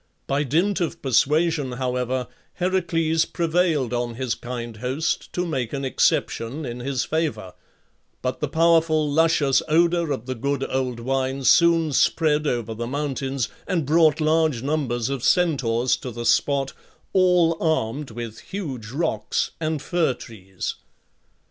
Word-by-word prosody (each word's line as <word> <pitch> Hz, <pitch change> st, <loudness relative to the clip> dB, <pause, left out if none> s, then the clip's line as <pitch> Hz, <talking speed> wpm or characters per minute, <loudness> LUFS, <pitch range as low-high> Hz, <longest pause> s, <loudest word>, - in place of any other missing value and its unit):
By 140 Hz, +1 st, 0 dB
dint 170 Hz, +8 st, +1 dB
of 170 Hz, 0 st, -2 dB
persuasion, 145 Hz, +2 st, +2 dB
however, 125 Hz, 0 st, -2 dB, 0.3 s
Heracles 165 Hz, -3 st, +1 dB
prevailed 165 Hz, -7 st, 0 dB
on 120 Hz, -1 st, -2 dB
his 125 Hz, -2 st, -1 dB
kind 120 Hz, -2 st, -6 dB
host 130 Hz, +7 st, -2 dB
to 180 Hz, -, -1 dB
make 130 Hz, -9 st, -3 dB
an 140 Hz, -1 st, -2 dB
exception 130 Hz, +2 st, 0 dB
in 120 Hz, 0 st, -5 dB
his 130 Hz, 0 st, -1 dB
favour; 115 Hz, -, -2 dB, 0.7 s
but 125 Hz, 0 st, -2 dB
the 150 Hz, -, -1 dB
powerful, 160 Hz, 0 st, +3 dB
luscious 150 Hz, -2 st, +3 dB
odour 170 Hz, +1 st, +2 dB
of 130 Hz, -4 st, -3 dB
the 130 Hz, -, -3 dB
good 140 Hz, +3 st, -2 dB
old 130 Hz, -2 st, -2 dB
wine 135 Hz, +2 st, -1 dB
soon 165 Hz, 0 st, +4 dB
spread 150 Hz, +2 st, +2 dB
over 115 Hz, -4 st, -1 dB
the 115 Hz, +1 st, -4 dB
mountains, 135 Hz, -1 st, -2 dB, 0.2 s
and 170 Hz, -5 st, 0 dB
brought 155 Hz, +1 st, +4 dB
large 155 Hz, -5 st, +2 dB
numbers 130 Hz, -5 st, -1 dB
of 135 Hz, -3 st, -3 dB
Centaurs 130 Hz, -9 st, +2 dB
to 130 Hz, -, -7 dB
the 120 Hz, 0 st, -6 dB
spot, 135 Hz, +2 st, +2 dB, 0.4 s
all 180 Hz, -3 st, +4 dB
armed 150 Hz, -3 st, 0 dB
with 115 Hz, -1 st, -7 dB
huge 135 Hz, -, -6 dB
rocks 125 Hz, -6 st, -1 dB
and 155 Hz, -2 st, -2 dB
fir 170 Hz, -7 st, +1 dB
trees. 95 Hz, -5 st, -7 dB
140 Hz, 140 wpm, -23 LUFS, 125-160 Hz, 0.7 s, soon